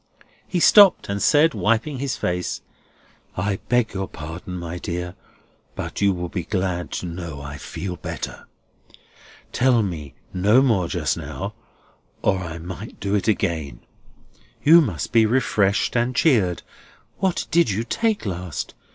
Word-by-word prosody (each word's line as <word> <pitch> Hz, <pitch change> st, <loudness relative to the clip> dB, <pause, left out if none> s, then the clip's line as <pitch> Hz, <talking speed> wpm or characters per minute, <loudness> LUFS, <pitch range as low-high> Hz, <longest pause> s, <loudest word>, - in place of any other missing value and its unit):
He 180 Hz, -, -1 dB
stopped 200 Hz, -, +7 dB
and 100 Hz, 0 st, -2 dB
said, 150 Hz, +1 st, +4 dB
wiping 115 Hz, +6 st, 0 dB
his 135 Hz, -3 st, -2 dB
face: 90 Hz, 0 st, -2 dB, 0.7 s
"I 100 Hz, +1 st, 0 dB
beg 120 Hz, -1 st, +2 dB
your 95 Hz, 0 st, -3 dB
pardon, 85 Hz, +4 st, -7 dB
my 85 Hz, 0 st, -5 dB
dear, 90 Hz, +1 st, -4 dB, 0.6 s
but -, -, -5 dB
you 100 Hz, -1 st, +4 dB
will 90 Hz, -1 st, -3 dB
be 90 Hz, +1 st, -3 dB
glad 90 Hz, -1 st, -2 dB
to -, -, -3 dB
know 85 Hz, -4 st, -6 dB
I 70 Hz, 0 st, -7 dB
feel 90 Hz, +3 st, -5 dB
better. -, -, -6 dB, 1.0 s
Tell 125 Hz, -3 st, +3 dB
me 75 Hz, -8 st, -5 dB, 0.2 s
no 105 Hz, +8 st, +4 dB
more 105 Hz, -10 st, +2 dB
just -, -, -1 dB
now, -, -, -5 dB, 0.7 s
or 95 Hz, -, +2 dB
I 85 Hz, -3 st, -5 dB
might 90 Hz, +6 st, -8 dB
do 100 Hz, 0 st, -2 dB
it 105 Hz, +1 st, +1 dB
again. 80 Hz, -, -1 dB, 0.8 s
You 165 Hz, +3 st, +8 dB
must 150 Hz, -, -3 dB
be 115 Hz, -2 st, +5 dB
refreshed 105 Hz, -5 st, +1 dB
and 120 Hz, +1 st, +1 dB
cheered. 105 Hz, -, +2 dB, 0.6 s
What 190 Hz, -2 st, 0 dB
did 170 Hz, -6 st, +4 dB
you 105 Hz, +3 st, -1 dB
take 220 Hz, -, 0 dB
last? 90 Hz, -, -4 dB
95 Hz, 145 wpm, -23 LUFS, 90-120 Hz, 1.0 s, You